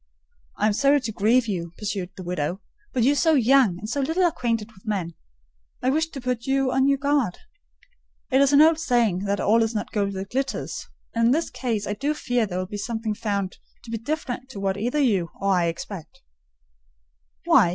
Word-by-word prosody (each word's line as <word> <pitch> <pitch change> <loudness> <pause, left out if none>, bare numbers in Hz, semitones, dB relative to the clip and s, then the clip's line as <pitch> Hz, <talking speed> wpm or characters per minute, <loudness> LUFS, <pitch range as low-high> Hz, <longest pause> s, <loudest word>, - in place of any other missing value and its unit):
"I - - +1
am 215 - +3
sorry 280 +6 +4
to 225 -3 -3
grieve 230 +4 +2
you," 170 -5 -3
pursued 200 -3 -3
the 185 - -7
widow; 175 0 -2 0.3
"but 245 - +1
you 265 - +5
are - - +1
so 320 +2 +3
young, 255 -7 +4
and 210 +4 -7
so 280 +5 -1
little 325 +7 +1
acquainted 230 -9 -1
with 190 - -20
men, 190 -6 -2 0.7
I 260 - +3
wished 320 +3 0
to - - -4
put 250 -1 -2
you 270 -1 +2
on 265 +1 +3
your 280 0 +3
guard. 280 -8 +1 0.9
It 265 +1 +5
is 280 0 +4
an 290 +1 +7
old 320 0 +4
saying 235 - +1
that 200 0 0
'all 225 +4 +3
is 225 0 0
not 210 - -3
gold 200 -2 0
that 195 0 -6
glitters;' 270 +2 -3 0.3
and 230 0 +2
in - - +4
this 325 +3 -1
case 225 -5 -2
I 205 - -2
do 285 +7 -1
fear 245 -6 0
there 180 -2 -4
will 185 - -1
be 205 +3 -6
something 220 +1 -3
found 200 -3 -3 0.2
to 230 - -10
be 225 - -2
different 260 0 -4
to 245 - -8
what 195 -1 0
either 240 +8 -2
you 205 - +2
or 200 - 0
I 175 -2 +2
expect." 165 0 -6 1.2
"Why? 175 - +5
230 Hz, 215 wpm, -24 LUFS, 200-270 Hz, 1.2 s, an